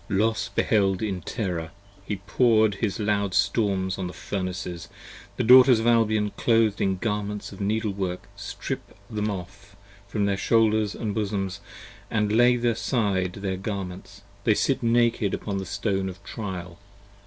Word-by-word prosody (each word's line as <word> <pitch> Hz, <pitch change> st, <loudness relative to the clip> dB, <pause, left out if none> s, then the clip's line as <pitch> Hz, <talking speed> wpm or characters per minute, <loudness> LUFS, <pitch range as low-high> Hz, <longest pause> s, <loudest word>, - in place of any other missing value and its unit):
Los 110 Hz, +3 st, +1 dB
beheld 100 Hz, -3 st, +1 dB
in 95 Hz, -4 st, -2 dB
terror; 90 Hz, -6 st, -3 dB, 0.3 s
he 100 Hz, +1 st, -3 dB
pour'd 110 Hz, -2 st, +3 dB
his 110 Hz, 0 st, -1 dB
loud 100 Hz, -3 st, 0 dB
storms 95 Hz, -4 st, +1 dB
on 95 Hz, -, -2 dB
the 90 Hz, -, -7 dB
Furnaces: 90 Hz, -3 st, -5 dB, 0.5 s
The -, -, +1 dB
Daughters 125 Hz, 0 st, +8 dB
of 110 Hz, -, -2 dB
Albion 110 Hz, -3 st, +3 dB
clothed 115 Hz, -3 st, +2 dB
in 95 Hz, -1 st, +1 dB
garments 105 Hz, -1 st, -3 dB
of 100 Hz, -, -9 dB
needle 105 Hz, +1 st, 0 dB
work 95 Hz, -1 st, -4 dB
Strip 100 Hz, 0 st, -6 dB
them 105 Hz, 0 st, -1 dB
off 100 Hz, +1 st, -8 dB, 0.3 s
from 100 Hz, 0 st, -1 dB
their 100 Hz, -1 st, +1 dB
shoulders 110 Hz, -1 st, +2 dB
and 110 Hz, -3 st, -3 dB
bosoms, 100 Hz, -3 st, -2 dB, 0.5 s
they 110 Hz, -, 0 dB
lay 120 Hz, +4 st, +4 dB
aside 115 Hz, -6 st, 0 dB
Their 95 Hz, -1 st, -3 dB
garments, 95 Hz, 0 st, -6 dB, 0.2 s
they 110 Hz, -1 st, +3 dB
sit 135 Hz, +4 st, +1 dB
naked 115 Hz, -3 st, +2 dB
upon 100 Hz, -2 st, -4 dB
the 95 Hz, -, -6 dB
Stone 95 Hz, -1 st, -1 dB
of 95 Hz, +2 st, -11 dB
trial. 95 Hz, -5 st, -6 dB
100 Hz, 150 wpm, -25 LUFS, 95-110 Hz, 0.5 s, Daughters